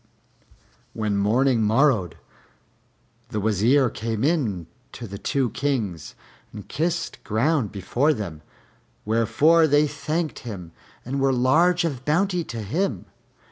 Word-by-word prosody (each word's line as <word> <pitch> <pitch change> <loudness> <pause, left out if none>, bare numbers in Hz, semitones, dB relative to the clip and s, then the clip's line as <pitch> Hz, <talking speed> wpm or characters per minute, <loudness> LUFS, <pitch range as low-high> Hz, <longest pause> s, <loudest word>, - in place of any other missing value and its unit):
When 105 -2 -1
morning 115 +5 +2
morrowed, 110 - +2 1.2
the 110 -3 -3
Wazir 110 +5 +2
came 110 -1 -3
in 125 - 0 0.3
to 120 - -7
the 100 -2 -8
two 130 +4 0
Kings 115 - -3 0.4
and 105 -2 -10
kissed 170 +2 -2
ground 120 +1 0
before 120 - 0
them; 95 - -5 0.6
wherefore 150 +9 +3
they 145 +1 +4
thanked 155 +2 -3
him 95 -8 -8 0.3
and 135 +3 -3
were 135 0 +3
large 165 +8 +3
of 135 -6 -3
bounty 180 +4 +1
to 115 -2 -6
him. 115 - -2
125 Hz, 120 wpm, -24 LUFS, 105-150 Hz, 1.2 s, they